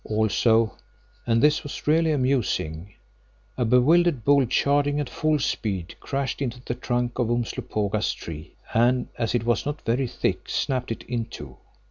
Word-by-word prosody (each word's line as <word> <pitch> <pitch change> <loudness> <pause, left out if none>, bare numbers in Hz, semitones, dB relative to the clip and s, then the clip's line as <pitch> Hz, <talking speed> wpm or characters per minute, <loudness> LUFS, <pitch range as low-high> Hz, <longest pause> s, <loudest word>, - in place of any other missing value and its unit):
Also, 110 +1 +2 0.5
and 115 0 +2
this 150 +1 +4
was 145 - -8
really 160 +2 +3
amusing—a 120 - -3
bewildered 130 +3 +3
bull 140 -2 +4
charging 145 +3 +2
at 145 - -2
full 155 +3 0
speed, 95 - -2
crashed 140 0 -3
into 125 -2 -3
the - - -2
trunk 120 0 -2
of 120 -2 +1
Umslopogaas' 110 -3 -1
tree, 80 +1 -9 0.2
and 125 +2 +3
as 115 0 0
it 115 - 0
was 120 0 +1
not 145 +1 -4
very 125 +3 +1
thick, - - -2
snapped 125 -3 -1
it 115 - -5
in 120 -2 -3
two. 70 - -10
120 Hz, 150 wpm, -25 LUFS, 110-140 Hz, 0.5 s, this